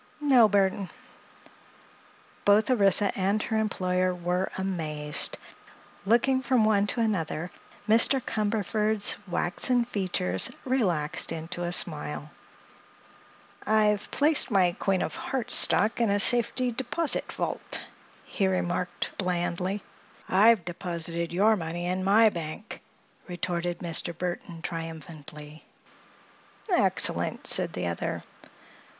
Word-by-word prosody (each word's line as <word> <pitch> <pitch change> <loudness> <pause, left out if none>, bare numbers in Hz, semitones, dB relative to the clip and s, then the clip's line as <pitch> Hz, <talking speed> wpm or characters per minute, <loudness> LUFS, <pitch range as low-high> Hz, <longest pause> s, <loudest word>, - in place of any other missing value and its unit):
"No, 260 -7 +5
Burthon." 195 -1 +1 1.5
Both 210 +5 +4
Orissa 200 -3 +3
and 200 +2 0
her 220 - -2
employer 185 -3 0
were 180 +2 -2
amazed. 155 -6 0 0.7
Looking 260 +4 +3
from 255 -4 +2
one 205 -1 +2
to 235 - -1
another, 175 -5 -2 0.4
Mr. 230 +5 +4
Cumberford's 215 -1 0
waxen 235 +8 +1
features 180 - 0 0.2
relaxed 185 - 0
into 165 +2 -5
a 175 - -2
smile. 150 -3 -2 1.3
"I've 210 -1 +1
placed 295 0 +2
my 185 -5 +2
Queen 190 -2 0
of - - -4
Hearts 260 -5 -2
stock 220 +3 +4
in 230 - +2
a 200 0 +1
safety 245 +3 +3
deposit 265 +6 0
vault," - - -4 0.4
he 195 - -1
remarked 180 -1 -2
blandly. 180 +1 -2 0.4
"I 195 +4 +4
have 225 -7 +4
deposited 170 -1 -3
your 205 +5 +3
money 170 -1 -4
in 185 +1 -2
my 215 +3 +5
bank," 170 +3 -7 0.5
retorted 175 -1 -3
Mr. 170 -1 0
Burthon, 175 -2 -5
triumphantly. 155 -2 -8 1.1
"Excellent!" - - 0
said - - 0
the 90 - -3
other. 85 -1 -3
190 Hz, 110 wpm, -27 LUFS, 170-220 Hz, 1.5 s, No